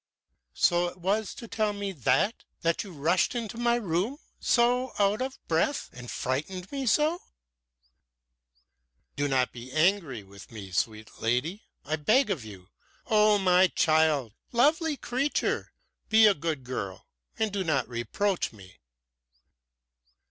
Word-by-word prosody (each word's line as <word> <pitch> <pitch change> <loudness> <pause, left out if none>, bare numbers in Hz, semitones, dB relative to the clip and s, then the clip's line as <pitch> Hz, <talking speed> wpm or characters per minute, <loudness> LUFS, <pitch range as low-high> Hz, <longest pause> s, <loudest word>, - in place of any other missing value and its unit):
"So 175 0 +3
it 175 - -8
was 195 +4 -1
to 235 - -9
tell 215 -2 0
me 200 -1 -4
that 190 - +1 0.2
that 165 +5 +1
you 200 - -10
rushed 170 - +1
into 230 -3 -4
my 240 0 +3
room 205 - -1 0.2
so 245 +1 +2
out 205 +3 +2
of 260 +1 -3
breath 165 - 0
and 125 -1 -9
frightened 165 +8 -3
me 275 -2 -3
so?" 310 - +2 1.9
"Do 145 0 0
not 130 -2 +1
be 125 +1 -10
angry 155 - +1
with 100 +1 -14
me, 100 -4 -9
sweet 110 +4 -3
lady, 130 - -1 0.2
I 155 +2 -1
beg 215 - +3
of 160 - -2
you! 95 -3 -12 0.4
Oh, 215 -1 +4
my 185 -1 +5
child! 155 - +2 0.2
Lovely 300 +5 +2
creature! 265 +5 -1 0.4
Be 220 0 +7
a 210 - +7
good 155 -5 -3
girl 100 -7 -5 0.3
and 220 -1 0
do 200 -1 -1
not 155 -6 0
reproach 170 +11 -1
me!" 95 -4 -16
180 Hz, 140 wpm, -28 LUFS, 130-220 Hz, 1.9 s, Be